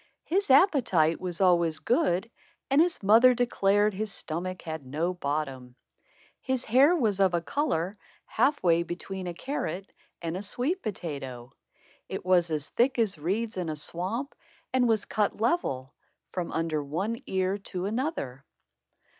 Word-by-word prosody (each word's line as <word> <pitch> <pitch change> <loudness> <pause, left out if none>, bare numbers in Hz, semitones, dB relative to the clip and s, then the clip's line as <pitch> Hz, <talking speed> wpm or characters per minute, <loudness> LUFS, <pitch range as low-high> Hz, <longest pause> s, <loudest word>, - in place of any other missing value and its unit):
His 385 +1 0
appetite 255 - +4
was 180 -2 -4
always 170 -4 +3
good 230 - +1 0.4
and 280 +3 +6
his 335 - +1
mother 230 +5 +7
declared 210 -3 +2
his 210 +2 -3
stomach 180 +3 -4
had 160 -2 -5
no 155 +7 -2
bottom. 140 -6 -3 0.7
His 260 -1 -1
hair 270 +9 +5
was 215 - +1
of 190 -3 +4
a 170 - 0
color 195 - -1 0.3
half 290 0 +1
way 170 -1 +4
between 180 +2 -5
a 175 - -5
carrot 195 - -4 0.3
and 165 0 -4
a 185 - -3
sweet 255 - -1
potato. 135 - -6 0.6
It - - -5
was 180 -2 +3
as 155 -2 -2
thick 250 +2 +2
as 210 -8 +1
reeds 205 +7 -2
in 175 -3 -2
a 155 - -2
swamp 185 - -3 0.4
and 255 -1 +3
was 220 -2 +2
cut 210 -1 -1
level, 180 - 0 0.4
from 180 -2 -3
under 160 -2 -1
one 195 - -3
ear 190 +1 0
to 185 -2 -5
another. 210 - -3
190 Hz, 150 wpm, -28 LUFS, 165-235 Hz, 0.7 s, mother